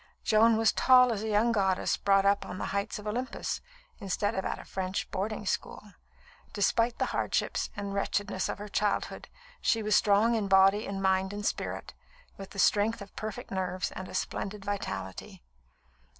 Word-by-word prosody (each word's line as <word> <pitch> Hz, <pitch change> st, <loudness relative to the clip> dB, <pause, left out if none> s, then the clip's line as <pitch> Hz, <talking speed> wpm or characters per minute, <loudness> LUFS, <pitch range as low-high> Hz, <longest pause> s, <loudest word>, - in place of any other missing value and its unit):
Joan 220 Hz, +1 st, +4 dB
was 225 Hz, 0 st, +4 dB
tall 250 Hz, -1 st, +5 dB
as 205 Hz, -, -4 dB
a 220 Hz, -, -3 dB
young 220 Hz, +2 st, +3 dB
goddess 190 Hz, -4 st, +1 dB
brought 195 Hz, 0 st, +3 dB
up 200 Hz, 0 st, +3 dB
on 185 Hz, -, -7 dB
the -, -, -3 dB
heights 200 Hz, +1 st, -2 dB
of 210 Hz, -, -10 dB
Olympus, 245 Hz, +5 st, -3 dB, 0.4 s
instead 200 Hz, +1 st, -1 dB
of 190 Hz, -, -2 dB
at -, -, -2 dB
a -, -, -11 dB
French 190 Hz, 0 st, -3 dB
boarding 210 Hz, +2 st, -3 dB
school. 205 Hz, +1 st, -4 dB, 0.6 s
Despite 230 Hz, +4 st, +1 dB
the -, -, +1 dB
hardships -, -, -1 dB
and 200 Hz, -1 st, -4 dB
wretchedness 200 Hz, -1 st, -1 dB
of -, -, -3 dB
her 205 Hz, +1 st, -7 dB
childhood, 205 Hz, 0 st, -1 dB, 0.3 s
she 225 Hz, -1 st, +1 dB
was 210 Hz, 0 st, +2 dB
strong 210 Hz, +3 st, +4 dB
in 215 Hz, -3 st, 0 dB
body 195 Hz, +2 st, +5 dB
and 195 Hz, -1 st, -4 dB
mind 190 Hz, +1 st, +1 dB
and 205 Hz, 0 st, -5 dB
spirit, -, -, -3 dB, 0.4 s
with 195 Hz, -1 st, -9 dB
the -, -, -12 dB
strength 210 Hz, +3 st, +3 dB
of 200 Hz, -1 st, -11 dB
perfect 215 Hz, -1 st, -6 dB
nerves 185 Hz, -1 st, -2 dB
and 185 Hz, -, -7 dB
a -, -, -8 dB
splendid 200 Hz, 0 st, -3 dB
vitality. 95 Hz, -, -5 dB
205 Hz, 180 wpm, -29 LUFS, 195-215 Hz, 0.6 s, tall